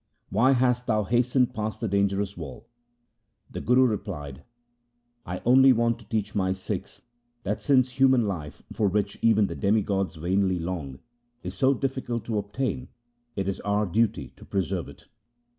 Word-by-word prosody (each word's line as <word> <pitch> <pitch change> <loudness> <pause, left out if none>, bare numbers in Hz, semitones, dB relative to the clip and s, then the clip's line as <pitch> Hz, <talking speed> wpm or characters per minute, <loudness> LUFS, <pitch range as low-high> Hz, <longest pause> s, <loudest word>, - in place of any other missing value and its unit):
Why 125 +7 +4
hast 125 -1 +1
thou 110 -2 +2
hastened 125 +3 +2
past 110 0 -3
the 115 - -2
dangerous 100 0 0
wall? 80 -6 -9 0.4
' 110 -1 -37
The - - -5
Guru 125 +3 +4
replied: 95 - -4 0.4
' 120 0 -47
I 90 - -6
only 130 +2 +7
want 115 0 +1
to - - -18
teach 105 -2 -2
my 95 -2 +1
Sikhs 95 0 -6 0.4
that 105 +2 -2
since 130 -2 +2
human 130 -3 +5
life, 80 -7 -5
for 105 - +1
which 100 +1 -1
even 110 -2 +4
the - - -4
demigods 100 -2 0
vainly 95 +3 +1
long, 80 -6 -4 0.5
is 90 - -5
so 130 +8 +3
difficult 130 -4 -3
to 110 -3 -1
obtain, 125 +5 -3 0.5
it 95 -1 -2
is 100 - -2
our 105 +1 0
duty 100 - 0
to - - -14
preserve 95 -5 -2
it. - - -15
105 Hz, 165 wpm, -26 LUFS, 95-120 Hz, 0.5 s, only